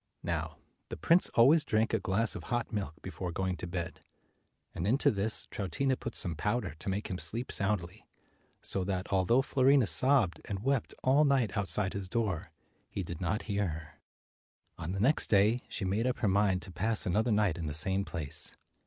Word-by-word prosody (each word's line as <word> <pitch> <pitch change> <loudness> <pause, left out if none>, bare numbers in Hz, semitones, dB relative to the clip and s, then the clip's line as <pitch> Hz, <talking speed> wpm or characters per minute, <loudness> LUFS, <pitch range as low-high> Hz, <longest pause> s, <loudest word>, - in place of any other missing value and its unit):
Now - - -3 0.3
the - - -6
prince 165 - +4
always 145 +7 +6
drank 110 -4 0
a 110 - +2
glass 100 +4 0
of - - -7
hot 120 -2 -2
milk 95 -8 -3
before 90 0 -5
going 95 +1 -2
to - - -6
bed, 85 -2 -5 0.7
and 85 - -3
into 130 +6 +3
this 105 +2 +1
Troutina 130 +7 -1
put 120 -2 -7
some 85 - +4
powder 105 +1 -2
to - - -4
make 100 +2 -2
him 90 - -3
sleep 120 +3 -2
soundly. 100 -1 0 0.6
So 95 - +1
that, 95 0 -3
although 95 +8 +3
Fiorina 135 -3 +3
sobbed 110 - +2
and 100 -1 -5
wept 135 -2 0
all 135 +4 +4
night 135 -8 +2
outside 100 -1 0
his 100 -2 -5
door, 95 -6 -2 0.4
he 100 - -4
did 85 0 -7
not 95 +5 -1
hear 100 -2 -1
her. 75 -2 -8 0.8
226 - - -6
On 80 - -3
the 100 +5 +1
next 150 - +2
day, 105 +4 +3
she 100 - -4
made 105 +6 0
up 125 - -1
her 115 - 0
mind 95 -1 +2
to 95 - -10
pass 105 +6 0
another 110 +5 +1
night 105 -5 +1
in 80 - -3
the 75 - -3
same 95 +5 +1
place. 80 -7 -1
100 Hz, 195 wpm, -31 LUFS, 90-115 Hz, 0.8 s, always